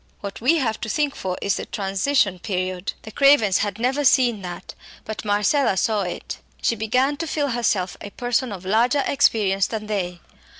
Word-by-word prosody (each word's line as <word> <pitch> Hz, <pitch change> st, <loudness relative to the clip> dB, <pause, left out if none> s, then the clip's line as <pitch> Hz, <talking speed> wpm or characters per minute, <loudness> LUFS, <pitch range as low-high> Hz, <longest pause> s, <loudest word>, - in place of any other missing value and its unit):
What 200 Hz, 0 st, -7 dB
we 290 Hz, +8 st, +4 dB
have 225 Hz, -7 st, -1 dB
to 220 Hz, -, -4 dB
think 295 Hz, +3 st, 0 dB
for 185 Hz, -1 st, -4 dB
is 200 Hz, -, +1 dB
the -, -, -5 dB
transition 195 Hz, 0 st, 0 dB
period. 185 Hz, -1 st, -3 dB
The 220 Hz, -, -9 dB
Cravens 230 Hz, -7 st, +4 dB
had 205 Hz, -1 st, -2 dB
never 260 Hz, +5 st, 0 dB
seen 245 Hz, -5 st, +4 dB
that, 175 Hz, -1 st, -7 dB, 0.3 s
but 220 Hz, 0 st, -5 dB
Marcella 210 Hz, +3 st, +2 dB
saw 215 Hz, +2 st, +1 dB
it. 180 Hz, -2 st, -5 dB, 0.2 s
She 230 Hz, -, +1 dB
began 255 Hz, +6 st, +1 dB
to 330 Hz, +2 st, -4 dB
feel 290 Hz, -2 st, -1 dB
herself 215 Hz, -7 st, 0 dB
a 205 Hz, -, -7 dB
person 245 Hz, +2 st, -1 dB
of 190 Hz, -2 st, -8 dB
larger 240 Hz, +8 st, +2 dB
experience 200 Hz, -8 st, +2 dB
than 215 Hz, -2 st, -5 dB
they. 185 Hz, -4 st, -3 dB
215 Hz, 180 wpm, -22 LUFS, 195-260 Hz, 0.3 s, we